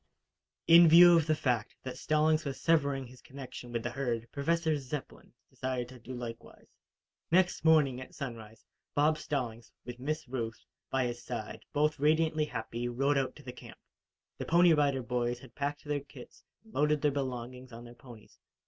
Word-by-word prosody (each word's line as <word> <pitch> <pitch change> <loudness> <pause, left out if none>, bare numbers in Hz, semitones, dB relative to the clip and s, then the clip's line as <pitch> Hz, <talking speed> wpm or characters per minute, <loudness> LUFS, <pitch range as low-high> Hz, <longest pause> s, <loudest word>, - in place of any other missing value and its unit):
In 170 +1 +8
view 175 +1 +9
of 165 -2 +2
the 155 - +3
fact 120 -6 -1
that 130 - -6
Stallings 155 +1 +2
was 135 -2 -5
severing 140 -4 +1
his 125 +1 -15
connection 130 -2 -10
with 115 -1 -3
the 120 - -3
herd, 120 -3 -2
Professor 160 +2 0
Zepplin 135 +1 -7 0.2
decided 130 -1 -3
to 130 -1 -12
do 130 +2 -8
likewise. 120 -1 -9 0.6
Next 180 -1 +2
morning, 150 -6 +4
at 130 - -11
sunrise, 115 -5 -8 0.3
Bob 155 +2 +3
Stallings, 120 -6 -4
with 125 0 -8
Miss 155 +2 -3
Ruth, 115 -6 -5 0.2
by 130 -1 +1
his 120 0 -4
side, 115 -4 -6
both 150 0 +1
radiantly 155 +1 +2
happy, 115 -2 -4
rode 135 +4 +1
out 130 - -3
to 150 - -14
the 125 -1 -8
camp. - - -13 0.6
The - - -4
Pony 170 0 +5
Rider 140 -4 +1
Boys 120 +1 -1
had 125 -1 -15
packed 145 +2 -3
their 145 -1 -1
kits 135 -2 -14 0.2
and 220 - -20
loaded 150 0 +1
their 150 - +3
belongings 130 -2 -5
on 120 +1 -10
their 120 - -12
ponies. 120 -3 -15
135 Hz, 175 wpm, -31 LUFS, 120-150 Hz, 0.6 s, view